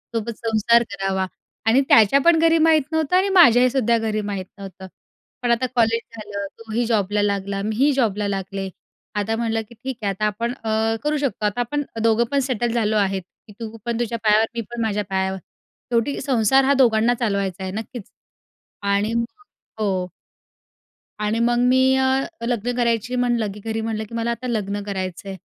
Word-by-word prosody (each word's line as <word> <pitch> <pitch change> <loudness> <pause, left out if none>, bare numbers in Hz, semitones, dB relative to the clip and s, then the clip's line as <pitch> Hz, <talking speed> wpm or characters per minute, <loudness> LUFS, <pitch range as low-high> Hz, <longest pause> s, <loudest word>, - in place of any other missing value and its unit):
सोबत 230 +1 -2
संसार 230 +1 +3
करावा 195 -1 -1 0.4
आणि 230 +4 +4
त्याच्या 225 +5 +6
पण 335 -1 +6
घरी 330 0 +4
माहीत 315 -1 +4
नव्हतं 320 +2 +1
आणि 385 +2 +3
माझ्याही 255 -9 +6
सुद्धा 235 -3 +2
घरी 220 -1 -1
माहीत 200 -2 -4
नव्हतं. 190 -1 -9 0.5
पण 245 -1 +1
आता 235 +2 +2
कॉलेज 230 -1 +3 0.2
झालं. 205 -2 -5
तो 225 -1 -12
ही 240 +2 +1
जॉबला 205 -2 +1
लागला. 200 -1 -1
मी 215 +2 -2
ही 275 +6 +3
जॉबला 210 -6 0
लागले. 195 0 -4 0.5
आता 210 +2 0
म्हटलं 225 -1 -1
की 235 - -14
ठीक 255 +2 -6
आहे 205 - 0
आता 195 +2 -2
आपण 230 +3 -1
अ, 220 0 +1
करू 300 +1 0
शकतो 265 -7 -2
आता 210 +3 -1
आपण 290 +5 -2 0.2
दोघं 230 +1 +3
पण 280 - +2
सेटल 245 -3 -1
झालो 220 -2 +1
आहेत 195 -1 +1 0.3
की 210 - -13
तू 225 -1 -6
पण 235 -1 -2
तुझ्या 235 -1 -1
पायावर 215 +1 +4
मी 235 - -1
पण 240 -1 -4
माझ्या 210 -2 0
पायावर 190 0 -1 0.5
शेवटी 235 +4 0
संसार 265 0 +3
हा 275 +1 +3
दोघांना 240 -3 +3
चालवायचा 200 -5 -1
आहे 190 - -4
नक्कीच. 220 +1 -7 0.7
आणि 200 +2 0
मग 235 0 +1 0.5
हो. 190 -3 0 1.1
आणि 210 +2 0
मग 240 +1 +2
मी 260 +1 +4
अ, 265 0 +2 0.3
लग्न 245 0 -1
करायची 235 0 0
म्हणलं 240 -4 0
की 210 - -11
घरी 225 0 -2
म्हणलं 220 -1 -3
की 230 - -8
"मला 230 0 -1
आता 235 +2 -5
लग्न 205 -3 -2
करायचंय." 190 -1 -5
225 Hz, 185 wpm, -22 LUFS, 205-245 Hz, 1.1 s, त्याच्या